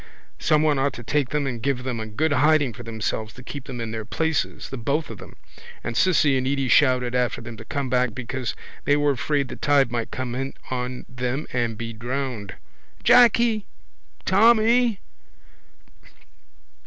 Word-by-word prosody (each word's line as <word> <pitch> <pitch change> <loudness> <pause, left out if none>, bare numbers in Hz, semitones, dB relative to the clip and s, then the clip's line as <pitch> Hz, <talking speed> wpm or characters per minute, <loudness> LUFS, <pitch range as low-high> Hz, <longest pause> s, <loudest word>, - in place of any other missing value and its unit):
Someone 150 -2 +3
ought 135 0 +1
to 120 - -9
take 140 +1 0
them 150 -1 -1
and 120 -4 -3
give 125 0 -1
them 125 -3 -3
a 110 - -4
good 145 +9 0
hiding 145 -2 +3
for - - -10
themselves 110 -1 -4
to 125 - -11
keep 140 +1 -7
them 125 -2 -7
in 115 -1 -4
their 110 -1 -4
places, 160 +7 -2
the 135 - -4
both 145 +6 -1
of - - -9
them. - - -12 0.5
And 115 - -4
Cissy 150 -5 +3
and 130 - -2
Edy 135 -1 0
shouted 125 -3 +4
after 125 -1 0
them 115 0 -8
to 115 - -10
come 140 0 -3
back 125 -2 +1
because 130 0 -4 0.3
they 145 - +4
were 145 0 +3
afraid 140 +1 0
the - - -8
tide 140 -4 +3
might 120 -2 -2
come 130 -2 -4
in 135 +2 -4 0.2
on 125 0 -3
them 125 +3 -3
and 120 -3 -1
be 115 0 -5
drowned. 120 -4 -4 0.5
—Jacky! 235 -3 +5 0.6
Tommy! 230 +2 +4
130 Hz, 175 wpm, -24 LUFS, 120-150 Hz, 0.6 s, Jacky